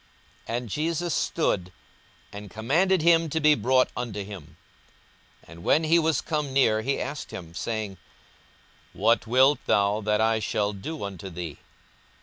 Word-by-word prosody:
42:018:040 115 Hz, -, -1 dB
And 120 Hz, -2 st, -6 dB
Jesus 165 Hz, -, -1 dB
stood, 90 Hz, -, 0 dB, 0.6 s
and 105 Hz, 0 st, -8 dB
commanded 155 Hz, -, +1 dB
him 165 Hz, -1 st, +4 dB
to 160 Hz, -, -1 dB
be 150 Hz, -1 st, +5 dB
brought 130 Hz, -2 st, +2 dB
unto 110 Hz, -5 st, -4 dB
him: 90 Hz, -6 st, -11 dB, 0.9 s
and 85 Hz, +1 st, -13 dB
when 155 Hz, -, +3 dB
he 165 Hz, +2 st, +4 dB
was 160 Hz, -1 st, +1 dB
come 150 Hz, -3 st, -2 dB
near, 110 Hz, -5 st, +3 dB
he 135 Hz, +5 st, -1 dB
asked 140 Hz, +1 st, -5 dB
him, 85 Hz, -3 st, -8 dB
42:018:041 85 Hz, -, -10 dB
Saying, 110 Hz, -4 st, -3 dB, 1.0 s
What 110 Hz, +2 st, +2 dB
wilt 130 Hz, +4 st, +4 dB
thou 100 Hz, +2 st, +2 dB
that 105 Hz, 0 st, +1 dB
I 110 Hz, 0 st, +2 dB
shall 105 Hz, -1 st, -1 dB
do 150 Hz, +10 st, -6 dB
unto 95 Hz, -2 st, -6 dB
thee? 85 Hz, -4 st, -7 dB
115 Hz, 155 wpm, -26 LUFS, 100-150 Hz, 1.0 s, be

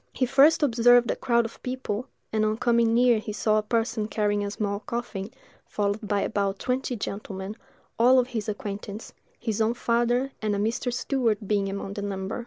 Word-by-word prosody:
He 255 Hz, -, +1 dB
first 275 Hz, +5 st, +5 dB
observed 245 Hz, -2 st, +5 dB
a -, -, -1 dB
crowd 235 Hz, -2 st, +1 dB
of 230 Hz, -, -9 dB
people, 255 Hz, -2 st, -4 dB, 0.3 s
and 215 Hz, -1 st, +2 dB
on 215 Hz, 0 st, +1 dB
coming 235 Hz, -1 st, +3 dB
nearer 240 Hz, -2 st, +4 dB
he 215 Hz, -, -6 dB
saw 215 Hz, +1 st, +2 dB
a -, -, 0 dB
person 225 Hz, 0 st, -1 dB
carrying 205 Hz, -1 st, 0 dB
a 200 Hz, -, -2 dB
small 200 Hz, -1 st, -2 dB
coffin, 225 Hz, -4 st, -5 dB, 0.4 s
followed 205 Hz, 0 st, -1 dB
by 205 Hz, -1 st, +1 dB
about 200 Hz, -2 st, -1 dB
twenty 255 Hz, +2 st, -2 dB
gentlemen, 200 Hz, -1 st, -5 dB, 0.4 s
all 250 Hz, +3 st, +6 dB
of 250 Hz, 0 st, +2 dB
his 220 Hz, -3 st, -3 dB
acquaintance, 205 Hz, +1 st, -6 dB, 0.3 s
his 225 Hz, -2 st, -2 dB
own 225 Hz, +2 st, +2 dB
father 240 Hz, +3 st, +1 dB
and 210 Hz, -1 st, 0 dB
a -, -, -1 dB
Mr. 225 Hz, +4 st, -1 dB
Stewart 240 Hz, -4 st, 0 dB
being 200 Hz, -1 st, +1 dB
among 195 Hz, 0 st, -5 dB
the 205 Hz, -, -5 dB
number. 195 Hz, +2 st, -4 dB
220 Hz, 190 wpm, -26 LUFS, 205-240 Hz, 0.4 s, all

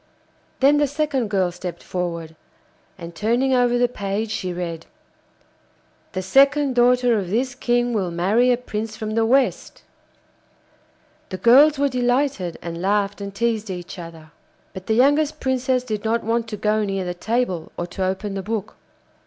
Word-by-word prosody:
Then 280 Hz, +2 st, +5 dB
the 290 Hz, 0 st, +3 dB
second 285 Hz, -5 st, -1 dB
girl 190 Hz, -3 st, +1 dB
stepped 175 Hz, -1 st, -7 dB
forward, 170 Hz, -3 st, -4 dB, 0.6 s
and 170 Hz, -2 st, -9 dB
turning 240 Hz, +8 st, +1 dB
over 245 Hz, -1 st, +3 dB
the 245 Hz, 0 st, +3 dB
page 210 Hz, -1 st, -3 dB
she 185 Hz, -4 st, -3 dB
read: 170 Hz, -2 st, -5 dB, 1.3 s
'The 185 Hz, -, -3 dB
second 275 Hz, +6 st, +4 dB
daughter 245 Hz, -1 st, +3 dB
of 185 Hz, -3 st, -5 dB
this 245 Hz, +5 st, 0 dB
King 245 Hz, -1 st, 0 dB
will 195 Hz, -5 st, 0 dB
marry 200 Hz, +9 st, +2 dB
a 245 Hz, -, +2 dB
prince 220 Hz, -2 st, -5 dB
from 215 Hz, -1 st, -4 dB
the 225 Hz, 0 st, +1 dB
West.' 265 Hz, +2 st, 0 dB, 1.5 s
The 185 Hz, -, -5 dB
girls 275 Hz, -, +6 dB
were 285 Hz, +1 st, +2 dB
delighted, 250 Hz, -, 0 dB
and 170 Hz, 0 st, -5 dB
laughed 200 Hz, +1 st, 0 dB
and 200 Hz, 0 st, -5 dB
teased 220 Hz, -1 st, -1 dB
each 180 Hz, 0 st, -7 dB
other. 165 Hz, -2 st, -11 dB, 0.4 s
But 190 Hz, 0 st, -9 dB
the 220 Hz, -, +2 dB
youngest 290 Hz, +5 st, +3 dB
Princess 260 Hz, -1 st, 0 dB
did 215 Hz, -4 st, -4 dB
not 225 Hz, +1 st, 0 dB
want 230 Hz, +1 st, -1 dB
to 215 Hz, -2 st, -5 dB
go 215 Hz, +1 st, +1 dB
near 195 Hz, -2 st, -2 dB
the 180 Hz, -, -3 dB
table 190 Hz, -3 st, -2 dB
or 175 Hz, -, -2 dB
to 180 Hz, +2 st, -5 dB
open 190 Hz, +2 st, -2 dB
the 195 Hz, -, -3 dB
book. 215 Hz, +1 st, -4 dB
220 Hz, 165 wpm, -22 LUFS, 185-250 Hz, 1.5 s, girls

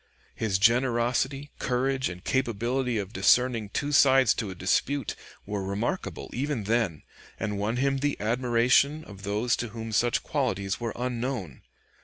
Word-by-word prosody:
His 105 Hz, -4 st, 0 dB
generosity, 125 Hz, +5 st, +1 dB
courage, 130 Hz, 0 st, 0 dB
and 90 Hz, 0 st, -9 dB
capability 125 Hz, 0 st, 0 dB
of 100 Hz, 0 st, -4 dB
discerning 120 Hz, -5 st, +3 dB
two 145 Hz, +7 st, -2 dB
sides 135 Hz, -4 st, +5 dB
to 105 Hz, -, -3 dB
a 95 Hz, -, -7 dB
dispute, 120 Hz, +8 st, 0 dB, 0.3 s
were 100 Hz, -1 st, -3 dB
remarkable 105 Hz, -, -3 dB
even 135 Hz, -2 st, -2 dB
then, 105 Hz, -7 st, 0 dB, 0.4 s
and 105 Hz, -2 st, -2 dB
won 110 Hz, +4 st, -1 dB
him 135 Hz, +1 st, +1 dB
the 145 Hz, +1 st, -1 dB
admiration 125 Hz, +6 st, +2 dB
of 100 Hz, -6 st, -12 dB
those 105 Hz, +4 st, 0 dB
to 120 Hz, -, -3 dB
whom 115 Hz, 0 st, -7 dB
such 120 Hz, +2 st, +1 dB
qualities 100 Hz, -10 st, -1 dB
were 115 Hz, -2 st, -3 dB
unknown. 120 Hz, -, -3 dB
120 Hz, 145 wpm, -27 LUFS, 105-130 Hz, 0.4 s, sides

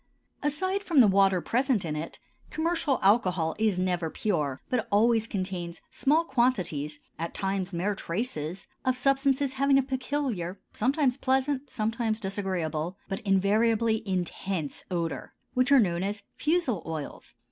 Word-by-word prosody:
Aside 375 Hz, +7 st, 0 dB
from 335 Hz, -8 st, +2 dB
the 245 Hz, -, +9 dB
water 195 Hz, -2 st, +4 dB
present 245 Hz, -, +1 dB
in 155 Hz, -2 st, -2 dB
it, 155 Hz, +2 st, -5 dB, 0.3 s
commercial 325 Hz, -3 st, 0 dB
alcohol 185 Hz, -6 st, +3 dB
is 215 Hz, -4 st, +2 dB
never 180 Hz, -3 st, 0 dB
pure, 150 Hz, -9 st, -1 dB
but 250 Hz, -4 st, -1 dB
always 225 Hz, +2 st, +3 dB
contains 185 Hz, -4 st, -4 dB
small 310 Hz, +4 st, +2 dB
quantities, 185 Hz, -, 0 dB, 0.2 s
at 165 Hz, +1 st, -4 dB
times 195 Hz, -1 st, -1 dB
mere 185 Hz, +4 st, 0 dB
traces, 180 Hz, -, -4 dB, 0.2 s
of 255 Hz, -1 st, +2 dB
substances 275 Hz, +1 st, +2 dB
having 275 Hz, +1 st, +3 dB
a 275 Hz, -, +3 dB
peculiar, 255 Hz, -9 st, -2 dB
sometimes 265 Hz, +2 st, +1 dB
pleasant, 265 Hz, +1 st, 0 dB
sometimes 225 Hz, 0 st, -1 dB
disagreeable, 185 Hz, -4 st, -2 dB
but 195 Hz, -1 st, -3 dB
invariably 220 Hz, +3 st, +2 dB
intense 180 Hz, -3 st, -2 dB
odor, 170 Hz, -2 st, -3 dB, 0.2 s
which 255 Hz, +2 st, +2 dB
are 280 Hz, -, +8 dB
known 175 Hz, -6 st, +2 dB
as 200 Hz, +1 st, -3 dB
fusel 305 Hz, -, +1 dB
oils. 160 Hz, -3 st, -6 dB
210 Hz, 135 wpm, -28 LUFS, 180-260 Hz, 0.3 s, the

